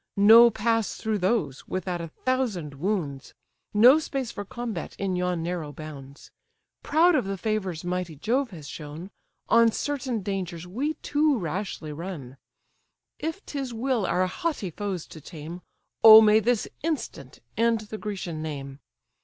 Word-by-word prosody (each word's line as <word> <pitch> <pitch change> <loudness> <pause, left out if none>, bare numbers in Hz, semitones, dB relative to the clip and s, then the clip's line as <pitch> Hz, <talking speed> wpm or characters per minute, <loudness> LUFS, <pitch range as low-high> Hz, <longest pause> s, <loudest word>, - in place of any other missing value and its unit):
No 225 +4 +8
pass 225 -1 0
through 220 -2 -2
those, 180 - -1
without 180 -1 -3
a 165 - -5
thousand 210 - -2
wounds, 160 -7 -3 0.4
No 245 +8 +7
space 270 -5 -4
for 205 - -6
combat 225 -3 -6
in 195 -2 -1
yon 180 -2 -1
narrow 170 -3 -3
bounds. 140 -2 -11 0.5
Proud 335 +4 +4
of 260 -9 +2
the 195 0 -3
favours 190 -5 -2
mighty 180 -2 -3
Jove 240 - 0
has 160 -7 -10
shown, 155 +6 -8 0.4
On 230 0 +5
certain 260 -5 -3
dangers 185 -4 -4
we 265 +12 -2
too 295 -1 +2
rashly 175 -4 -4
run: 145 -6 -7 0.8
If 320 +5 -4
'tis 285 - -5
his 260 -3 -4
will 235 -4 0
our 185 - +2
haughty 210 - -3
foes 190 -2 -4
to 160 - -12
tame, 165 +3 -9 0.4
Oh 220 -1 +12
may 215 0 +6
this 235 0 0
instant 275 - -4 0.2
end 230 0 +2
the 215 0 -8
Grecian 185 -6 -5
name! 140 -3 -6
195 Hz, 150 wpm, -26 LUFS, 165-235 Hz, 0.8 s, Oh